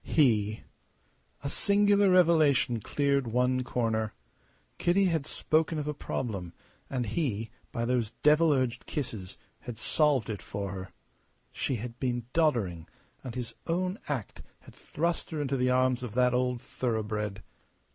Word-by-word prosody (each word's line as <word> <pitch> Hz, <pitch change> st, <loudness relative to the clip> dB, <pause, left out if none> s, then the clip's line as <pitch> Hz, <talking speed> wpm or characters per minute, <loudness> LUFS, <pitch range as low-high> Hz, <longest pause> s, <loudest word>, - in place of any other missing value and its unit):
He! 110 Hz, -8 st, +2 dB, 0.8 s
A -, -, -2 dB
singular 200 Hz, +4 st, +3 dB
revelation 155 Hz, -9 st, +4 dB
cleared 140 Hz, +3 st, +1 dB
one 125 Hz, +2 st, +1 dB
corner. 110 Hz, -3 st, -1 dB, 0.6 s
Kitty 195 Hz, +3 st, +3 dB
had 160 Hz, -5 st, 0 dB
spoken 160 Hz, +1 st, +1 dB
of 150 Hz, -1 st, -3 dB
a 150 Hz, -, -1 dB
problem; 100 Hz, -, -4 dB, 0.4 s
and 125 Hz, -2 st, -1 dB
he, 115 Hz, -3 st, -2 dB, 0.2 s
by 115 Hz, -1 st, -2 dB
those 120 Hz, -3 st, +1 dB
devil 155 Hz, +2 st, +5 dB
urged 130 Hz, -4 st, 0 dB
kisses, 110 Hz, -, -4 dB, 0.2 s
had 120 Hz, -2 st, -7 dB
solved 145 Hz, -2 st, +2 dB
it 100 Hz, -, -5 dB
for 100 Hz, -1 st, -4 dB
her. 95 Hz, -1 st, -6 dB, 0.6 s
She 135 Hz, -, -1 dB
had 120 Hz, +1 st, -6 dB
been 120 Hz, -3 st, -1 dB
doddering, 110 Hz, -, +1 dB, 0.4 s
and 125 Hz, -3 st, -6 dB
his 125 Hz, -3 st, -4 dB
own 185 Hz, +4 st, -1 dB
act 130 Hz, -9 st, -4 dB, 0.2 s
had -, -, -15 dB
thrust 170 Hz, +2 st, -2 dB
her 155 Hz, -, -4 dB
into 140 Hz, -2 st, 0 dB
the 125 Hz, -1 st, +2 dB
arms 130 Hz, 0 st, +2 dB
of 120 Hz, -3 st, -6 dB
that 125 Hz, -1 st, +4 dB
old 125 Hz, -1 st, 0 dB
thoroughbred. 105 Hz, -4 st, -2 dB
125 Hz, 145 wpm, -29 LUFS, 110-150 Hz, 0.8 s, devil